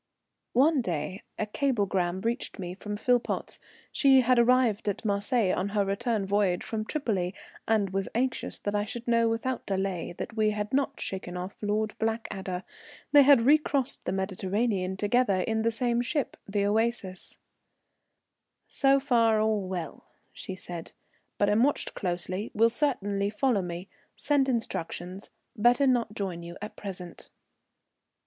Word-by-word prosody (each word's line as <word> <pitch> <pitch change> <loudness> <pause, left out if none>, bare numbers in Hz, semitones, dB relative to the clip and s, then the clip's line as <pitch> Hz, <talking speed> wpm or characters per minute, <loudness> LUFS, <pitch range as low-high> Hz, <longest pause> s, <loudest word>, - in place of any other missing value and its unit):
One 280 +3 +4
day 175 0 -3 0.2
a 215 - -1
cablegram 200 -7 0
reached 235 +4 -2
me 180 -2 -5
from 205 +2 -6
Philpotts. 245 +2 0 0.3
She 270 -2 +5
had 250 0 +3
arrived 235 -3 +3
at 205 - -4
Marseilles 205 0 +1
on 190 +2 -1
her 200 - +3
return 210 +1 -1
voyage 195 -2 +1
from 215 -1 -3
Tripoli, 200 - -1 0.3
and 210 -4 +2
was 195 0 -2
anxious 255 +2 -1
that 205 - -3
I 205 0 +1
should 235 +3 -6
know 230 -1 +3
without 235 +2 -2
delay 190 -4 -2
that 225 - -6
we 215 -1 +3
had 210 +1 -3
not 275 0 0
shaken 180 -2 -4
off 180 +2 -5
Lord 215 +1 0
Blackadder. 200 -5 -3 0.5
They 290 - +8
had 275 -4 +6
recrossed 280 -1 +2
the - - -1
Mediterranean 190 0 -1
together 205 -2 +2
in 220 +4 0
the 230 - +2
same 240 +1 0
ship, 285 +3 -1
the 200 0 0
Oasis. 210 -3 -1 1.3
"So 275 0 +3
far 230 -5 +3
all 215 -3 +1
well," 180 -3 -5 0.3
she 190 - -6
said, 175 -2 -7 0.4
"but 205 - +2
am 210 +2 +3
watched 285 +3 +1
closely, 185 +2 -3
will 230 +2 +4
certainly 205 -7 0
follow 220 0 +1
me 175 +1 -6 0.3
send 280 -2 +1
instructions 190 -5 -3 0.3
better 240 +6 +4
not 240 -5 +1
join 185 -5 -3
you 170 0 -8
at 210 - -7
present." 180 -3 -7
210 Hz, 150 wpm, -28 LUFS, 190-240 Hz, 1.3 s, They